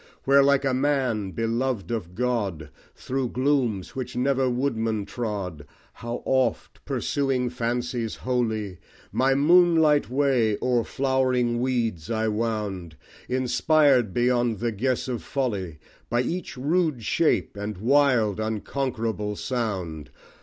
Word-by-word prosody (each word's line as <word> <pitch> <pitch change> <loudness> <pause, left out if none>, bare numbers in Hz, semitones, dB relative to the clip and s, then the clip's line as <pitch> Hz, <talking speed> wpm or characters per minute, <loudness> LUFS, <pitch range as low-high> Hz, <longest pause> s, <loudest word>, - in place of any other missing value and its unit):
Where 140 +1 +5
like 140 0 +3
a 135 - +1
man 130 -7 0
beloved 115 +2 -2
of 90 -7 -4
God, 100 -11 -2 0.2
Through 130 -1 -3
glooms 125 -8 0
which 130 -1 -5
never 130 +1 +1
woodman 115 -5 -1
trod, 100 - -5 0.3
How 120 +1 -6
oft, 130 -1 0
pursuing 130 -3 -1
fancies 120 -1 -2
holy, 110 -7 -2 0.3
My 135 +1 +2
moonlight 160 -1 +4
way 125 -6 +2
o'er 125 -2 +1
flowering 130 -3 +1
weeds 115 -10 -1
I 110 -1 0
wound, 105 -6 -3 0.3
Inspired, 130 -1 +3
beyond 120 0 +1
the 120 +3 -1
guess 125 +5 -1
of 125 -3 -3
folly, 100 - -3 0.3
By 120 +1 +2
each 175 0 -4
rude 150 -2 0
shape 120 - +1
and 105 0 -5
wild 120 -3 +3
unconquerable 110 -1 -2
sound! 95 - -3
120 Hz, 120 wpm, -25 LUFS, 110-130 Hz, 0.3 s, Where